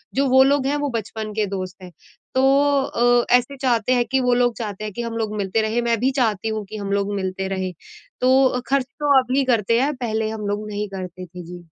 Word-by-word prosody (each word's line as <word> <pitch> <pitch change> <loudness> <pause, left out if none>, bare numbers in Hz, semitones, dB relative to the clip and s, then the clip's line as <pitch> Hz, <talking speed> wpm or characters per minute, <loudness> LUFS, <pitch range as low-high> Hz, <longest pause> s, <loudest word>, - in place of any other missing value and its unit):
जो 275 +1 +2
वो 265 +1 +7
लोग 275 0 +2
हैं 285 - +1
वो 290 -1 -1
बचपन 220 0 -4
के 215 0 0
दोस्त 185 0 -6
हैं। 180 - -10 0.4
तो 260 - +3 0.4
अ, 245 -2 +2
ऐसे 250 +3 0
चाहते 250 -2 +2
हैं 240 -1 +2
कि, 265 +1 0
वो 250 -1 +2
लोग 245 -1 +2
चाहते 210 -3 -5
हैं 210 -2 -5
कि 240 - -4
हम 230 -1 -4
लोग 215 -2 -2
मिलते 200 +2 0
रहें 220 +2 0
मैं 235 -1 +1
भी 260 +3 +2
चाहती 220 -2 0
हूँ 215 -1 -3
कि 215 - -6
हम 200 -1 -4
लोग 200 0 0
मिलते 190 0 -3
रहें। 190 -1 -3 0.5
तो 255 0 +3
ख़र्च 275 -1 +1
तो 285 -2 +4
अभी 260 +2 0
करते 230 -2 +2
हैं 290 +2 0
पहले 220 -3 -2
हम 215 -2 -5
लोग 205 +1 -3
नहीं 210 0 -3
करते 185 -1 -7
थे। 180 0 -10
जी। 175 0 -10
225 Hz, 235 wpm, -22 LUFS, 205-255 Hz, 0.5 s, वो